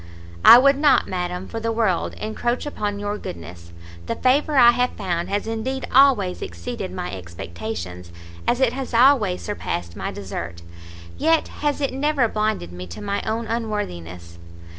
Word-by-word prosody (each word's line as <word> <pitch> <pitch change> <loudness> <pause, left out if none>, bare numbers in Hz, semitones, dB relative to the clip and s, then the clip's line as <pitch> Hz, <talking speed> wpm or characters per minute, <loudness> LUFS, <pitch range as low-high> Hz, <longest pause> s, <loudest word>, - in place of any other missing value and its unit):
"I 235 - +11
would 275 +2 +4
not, 290 -2 +4
madam, 180 0 -3
for 225 - -5
the 230 0 -1
world 220 -6 0
encroach 240 +4 -2
upon 210 -8 -3
your 205 +1 -3
goodness; 85 0 -9 0.4
the - - -1
favour 280 +3 +2
I 240 -2 +8
have 250 +1 0
found 175 -2 -3
has 205 0 -1
indeed 235 +4 -3
always 250 -9 +4
exceeded 85 +1 -6
my 90 -1 -5
expectations, 85 0 -7 0.4
as 245 - +2
it 260 -3 +3
has 260 -2 -4
always 230 -7 +4
surpassed 85 - -4
my - - -4
desert; 85 -3 -6 0.6
yet 325 +1 +2
has 295 0 -2
it 275 - -1
never 275 -2 +1
blinded 215 - -2
me 90 +1 -8
to 85 - -9
my 200 0 -2
own 225 +1 -1
unworthiness. 90 - -5
210 Hz, 160 wpm, -22 LUFS, -, 0.6 s, I